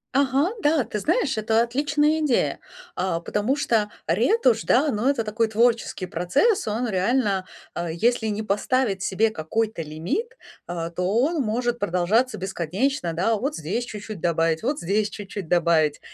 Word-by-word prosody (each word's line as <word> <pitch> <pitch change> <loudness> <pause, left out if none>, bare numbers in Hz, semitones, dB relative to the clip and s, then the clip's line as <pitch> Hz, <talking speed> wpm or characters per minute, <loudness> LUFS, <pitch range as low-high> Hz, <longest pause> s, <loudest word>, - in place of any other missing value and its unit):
Ага, 275 +5 +2
да, 295 -2 +3
ты 210 - -4
знаешь, 305 - +1
это 220 +1 +2
отличная 295 +5 +1
идея, 295 -6 +1 0.4
а, 180 -2 -1
потому 210 +9 -1
что 225 -7 +1 0.2
ретушь, 235 - +3
да, 280 +4 +3
ну 225 +5 +1
это 255 -5 +1
такой 220 +1 0
творческий 225 -3 +1
процесс. 190 - +1
Он 230 +4 -1
реально, 195 -1 0 0.3
а, 170 0 -3
если 220 +7 +1
не 215 0 -2
поставить 210 0 0
себе 215 +3 +1
какой-то 215 +3 -2
лимит, 280 - -4 0.3
а, 170 -1 -4
то 180 +1 -3
он 300 +4 +2
может 240 +1 -1
продолжаться 205 +7 +1
бесконечно, 190 - -2
да, 190 +7 +1
вот 275 +7 -2
здесь 200 +10 -3
чуть-чуть 210 -3 -7
добавить, 165 -1 +1
вот 280 +5 -1
здесь 205 +4 0
чуть-чуть 200 -3 -7
добавить, 165 -3 +2
220 Hz, 150 wpm, -24 LUFS, 180-255 Hz, 0.4 s, да